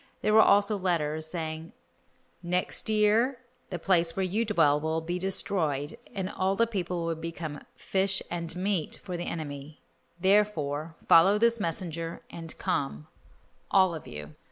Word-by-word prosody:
There 215 - +2
were 220 - +8
also 205 0 +4
letters, 160 -4 0
saying, 160 -1 -5 0.7
"Next 180 +4 -1
year 220 +5 +3 0.3
the 180 - -3
place 170 -1 +2
where 190 - 0
you 205 +5 0
dwell 160 -9 +3
will 160 +1 0
be 175 +2 -3
destroyed 165 -5 -1 0.2
and 190 -2 -2
all 190 +1 0
the 230 - +3
people 180 -6 -3
will 165 - 0
become 165 -2 -6
'fish 195 0 +1
and 170 -1 -1
meat' 185 -3 -1
for 180 - -5
the 175 0 -4
enemy, 150 -2 -6 0.4
therefore 165 -6 +1
follow 190 +5 +7
this 235 +1 +3
messenger 165 -2 -3
and 165 -1 -6
come, 70 +2 -2 0.6
all 190 -3 +4
of 160 - -7
you." 75 0 -8
175 Hz, 150 wpm, -28 LUFS, 160-195 Hz, 0.7 s, were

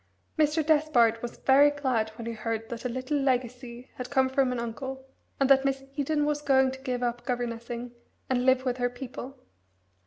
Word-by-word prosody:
Mr. 310 0 +2
Despard 295 -8 +3
was 240 - -6
very 280 +2 +5
glad 260 -7 0
when 230 - -8
he 230 - -3
heard 225 0 -4
that 235 +1 -6
a - - 0
little 260 +4 -2
legacy 250 -2 -2
had 250 -1 -5
come 265 -2 +2
from 265 -1 +2
an 250 - -2
uncle, 265 +3 -5 0.3
and 275 - +3
that 270 0 +5
Miss 270 -1 -1
Eden 295 +1 0
was 295 0 0
going 265 -2 +3
to 265 - -8
give 250 -2 -3
up 240 0 -2
governessing 240 -1 -4 0.4
and 250 -1 +1
live 260 0 +3
with 250 -1 0
her 245 -1 +1
people. 255 +1 -8
255 Hz, 190 wpm, -28 LUFS, 240-275 Hz, 0.4 s, very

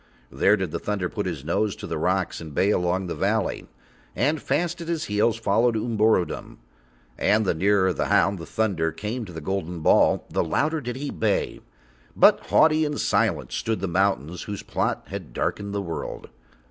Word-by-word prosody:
There 105 +2 +3
did 95 -5 -3
the 85 - -3
thunder 100 -4 -2
put 105 -3 -3
his 75 -6 -5
nose 100 +5 0
to - - -8
the - - -3
rocks - - 0
and 80 -3 -9
bay 100 +2 +3
along 90 0 0
the 85 - -3
valleys, - - -1 0.5
and 150 +4 +1
fast 175 0 -1
at 165 - -7
his 165 -2 -1
heels 105 +2 +1
followed 115 +2 +2
Umborodom. 110 -4 0 0.6
And 110 +1 +3
the - - +2
nearer 95 +2 +2
the - - -1
hound, 95 -1 +3
the 85 - -8
thunder, 95 -7 0
came 110 +6 -4
to 90 - -10
the 80 - -6
golden 90 -1 -3
ball - - +4
the - - 0
louder 155 - 0
did 125 -2 -4
he 140 +2 -4
bay, 105 -3 -1 0.6
but - - +6
haughty 155 0 +4
and 150 -1 -2
silent - - +1
stood 110 -2 -2
the 95 - -2
mountains 90 -3 0
whose 100 -2 -5
plot - - -1
had - - -7
darkened 100 0 -2
the 100 0 -2
world. 85 -3 -6
100 Hz, 185 wpm, -24 LUFS, 90-115 Hz, 0.6 s, but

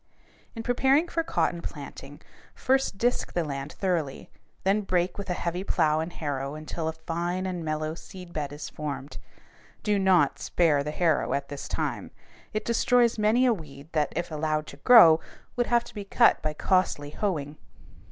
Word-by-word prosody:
In 225 - -5
preparing 270 +7 +3
for 335 - -1
cotton 175 - -1
planting, 145 -1 -9 0.3
first 265 -5 +1
disk 245 +4 0
the 175 - +1
land 140 -1 -5
thoroughly, 170 -8 -2 0.3
then 195 +2 +2
break 180 -2 0
with 200 -2 -7
a 180 - 0
heavy 175 +2 -3
plow 155 -5 +2
and 160 +2 -3
harrow 140 -3 -4
until 155 +1 -4
a 160 - -1
fine 175 +3 -3
and 180 -3 -3
mellow 155 0 -2
seed 180 +1 -11
bed 145 -2 -3
is 145 +1 -6
formed. 145 -2 -6 0.6
Do 210 -1 +2
not 190 -2 +3
spare 155 -5 +2
the 150 - -4
harrow 160 0 +1
at 140 0 -4
this 145 -1 -6
time. - - -3 0.4
It 215 - -3
destroys 235 0 +3
many 220 +4 +3
a 245 - +4
weed 145 -5 -10
that, 150 -2 0
if 175 -1 -3
allowed 155 0 -1
to 140 - -11
grow, 165 - +8 0.4
would 245 -1 0
have 235 -1 +3
to - - -13
be 205 - -5
cut 230 +4 +4
by 155 0 -2
costly 165 -5 +1
hoeing. 150 -8 -2
170 Hz, 175 wpm, -27 LUFS, 150-205 Hz, 0.6 s, grow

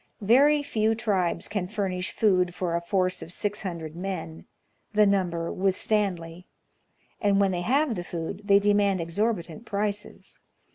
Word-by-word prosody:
Very 285 +7 +5
few 220 -5 +1
tribes 195 -7 -1
can 205 -3 -2
furnish 190 -1 -2
food 180 -4 +2
for 175 -2 -1
a 170 - 0
force 185 0 0
of 165 - -8
six 205 +3 -3
hundred 165 -5 -5
men 125 - -5 0.5
(the 210 0 +5
number 175 -4 0
with 190 0 +1
Stanley); 180 -5 -1 0.7
and 200 -1 +3
when 195 -1 +3
they 175 -1 -2
have 270 +7 +2
the 175 -4 -4
food, 175 +3 -5
they 200 -1 +6
demand 200 -1 +2
exorbitant 170 +1 -2
prices. 205 0 -4
195 Hz, 150 wpm, -26 LUFS, 175-210 Hz, 0.7 s, they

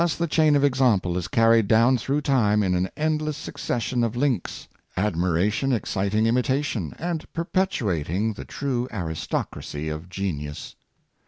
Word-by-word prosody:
the 170 - 0
chain 155 -2 +3
of 140 - +3
example 125 -10 +2
is 90 -2 -2
carried 115 0 +4
down 115 +4 +5
through 135 +5 -1
time 105 -8 +2
in 95 -2 +1
an 90 +1 0
endless 155 -1 -1
succession 120 -2 -2
of 115 0 -1
links 125 -7 -1
— - - -35
admiration 95 +7 0
excit 100 -4 -1
ing 110 +1 +3
imitation, 125 - 0
and 165 -1 -4
perpetuating 110 - -1
the - - -8
true 130 -4 -2
aristocracy 80 -4 -4
of 75 +3 -6
genius. 80 -7 -4
115 Hz, 145 wpm, -24 LUFS, 90-140 Hz, -, down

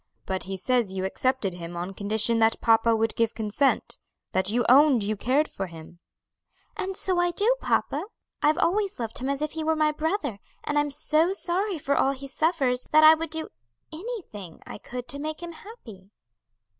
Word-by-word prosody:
"But 190 -1 -3
he 190 0 -5
says 235 +1 +1
you 190 0 -2
accepted 220 -1 -1
him 175 0 -8
on 180 +3 -5
condition 220 +3 0
that 225 0 +3
papa 225 0 +3
would 225 0 0
give 230 -1 0
consent, 225 +5 0 0.3
that 190 0 +1
you 240 +2 +1
owned 270 -2 +6
you 215 +2 -1
cared 265 +9 +1
for 195 - -5
him." 165 0 -13 0.8
"And 380 0 -3
so 370 -2 +2
I 350 0 +3
do, 420 +8 +2
papa; - - 0 0.4
I've 300 +1 +3
always 395 -1 0
loved 230 -2 -2
him 260 +2 -3
as 280 +1 -1
if 305 - -2
he 320 -1 -4
were 320 +1 +1
my 305 -1 +2
brother; 305 - -2 0.2
and 295 0 0
I'm 295 0 0
so 310 +5 +2
sorry 385 0 0
for 280 -1 -1
all 270 - +2
he 275 +1 -9
suffers, 270 -4 0
that 310 0 +6
I 310 +1 +10
would 325 +1 -3
do 320 +1 -4 0.4
anything 315 - -8
I - - -9
could 250 +2 -7
to 280 - +1
make 310 +2 -5
him 345 - -6
happy." 235 - -13
270 Hz, 195 wpm, -26 LUFS, 215-320 Hz, 0.8 s, I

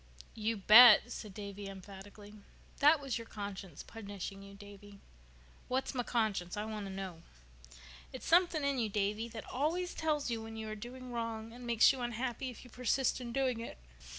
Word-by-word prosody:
"You 220 0 -1
bet!" 240 +4 +9
said 215 -4 -7
Davy 200 -1 -7
emphatically. 200 +2 -11 0.5
"That 295 +2 +6
was 275 -4 -3
your 230 - -9
conscience 200 -3 -7
punishing 200 -2 -7
you, 200 0 -12
Davy." 205 0 -13 0.7
"What's 260 +2 -1
my 250 - 0
conscience? 215 -7 -1
I 210 - -2
want 215 -2 -5
to - - -7
know." 190 -3 -6 0.9
"It's - - -8
something 340 -3 +4
in 280 -2 +1
you, 225 -2 0
Davy, 210 +2 -1
that 225 -1 -8
always 335 +7 -1
tells 300 -5 -1
you 230 -1 -2
when 225 0 -8
you 220 0 -5
are 215 - -4
doing 250 +3 -9
wrong 230 -1 -4
and 245 0 -9
makes 230 -1 +6
you 260 - -6
unhappy 245 +2 -3
if 245 - -10
you 250 - -15
persist 250 +1 0
in 240 -1 -6
doing 255 -2 0
it. 230 - -7
225 Hz, 180 wpm, -33 LUFS, 205-250 Hz, 0.9 s, bet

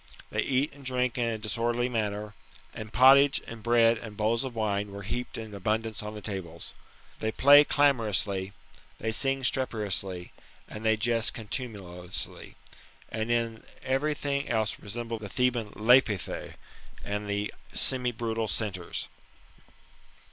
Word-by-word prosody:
They - - 0
eat 140 +2 0
and 140 0 -14
drink 125 -1 0
in 120 - +2
a 115 - -2
disorderly 115 +3 0
manner, 105 -3 -2 0.4
and 110 0 -7
pottage, 135 +3 +7
and 115 -1 -9
bread, 115 0 +4
and 110 -3 -9
bowls 115 +3 +1
of 130 -3 -5
wine, 105 -2 -1
were 100 0 -7
heaped 125 +5 -4
in 110 -2 -7
abundance 110 +2 -1
on 105 0 -6
the 105 - -8
tables. 90 -5 -6 0.5
They 110 - -1
play 145 +5 +8
qlamorously, 105 -10 +2 0.4
they 110 +6 -2
sing 135 +3 +1
streperously, 100 -8 -1 0.4
and 105 - -8
they 110 0 +3
jest 115 +1 +1
contumeliously, 100 -7 -5 0.5
and 110 +1 -3
in 115 -1 0 0.2
every 140 +3 0
thing 140 -1 -2
else 110 -2 0
resemble 115 +2 -4
the 105 -2 -7
Theban 120 -1 0
Lapithse, 110 -5 +2 0.5
and 105 0 -3
the 100 0 -2 0.2
semi 125 -2 0
brutal 115 -1 -2
Centaurs. 100 -6 -2
110 Hz, 140 wpm, -28 LUFS, 105-125 Hz, 0.5 s, play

